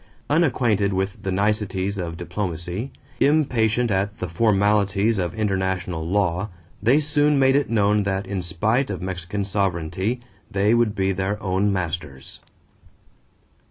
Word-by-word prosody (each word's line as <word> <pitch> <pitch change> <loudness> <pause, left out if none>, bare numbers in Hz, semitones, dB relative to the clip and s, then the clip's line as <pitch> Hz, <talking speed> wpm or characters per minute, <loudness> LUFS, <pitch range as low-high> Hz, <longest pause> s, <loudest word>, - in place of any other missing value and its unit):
Unacquainted 120 - +2
with 95 +2 -2
the 95 -2 -2
niceties 100 0 0
of 85 -2 -4
diplomacy, 90 - -4 0.3
impatient 125 -6 +2
at 100 +2 0
the 90 - -3
formalities 100 +2 +2
of 90 0 -2
international 95 -5 -1
law, 95 +1 0 0.3
they 120 +8 +4
soon 150 -1 +2
made 135 0 +4
it 145 0 +1
known 105 -2 +3
that 95 0 -1
in 100 -1 -3
spite 110 +10 0
of - - -3
Mexican 90 +2 -4
sovereignty 95 +3 -1 0.3
they 105 +1 +2
would 120 -3 +2
be 95 -1 +1
their 95 +2 -2
own 95 +1 +1
masters. 80 -7 -4
100 Hz, 130 wpm, -23 LUFS, 95-110 Hz, 0.3 s, they